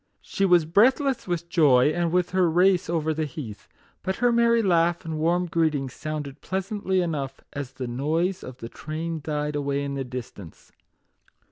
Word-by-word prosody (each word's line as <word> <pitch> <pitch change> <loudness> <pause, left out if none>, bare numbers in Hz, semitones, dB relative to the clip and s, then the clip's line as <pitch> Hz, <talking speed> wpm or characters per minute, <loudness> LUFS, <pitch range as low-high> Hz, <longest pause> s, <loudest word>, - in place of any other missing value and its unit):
She 195 - -1
was 175 -4 +5
breathless 255 - +3
with 170 -1 -2
joy, 145 -6 +4
and 170 0 0
with 180 0 +1
her 185 -2 +3
race 180 +2 +3
over 160 -2 0
the 155 0 -1
heath; 125 -7 -8 0.3
but 190 +1 -2
her 245 +2 +2
merry 235 -1 +3
laugh 170 -3 +2
and 160 -1 -4
warm 175 +3 +2
greeting 155 -5 0
sounded 150 0 -6
pleasantly 190 0 -1
enough 140 -6 -3
as 140 -3 -5
the 130 -1 -5
noise 155 +9 -1
of 125 -1 -9
the 115 - -7
train 160 +5 -5
died 150 -1 -2
away 140 -1 -1
in 140 0 -3
the 135 -1 -2
distance. 120 -9 -9
160 Hz, 170 wpm, -25 LUFS, 140-180 Hz, 0.3 s, was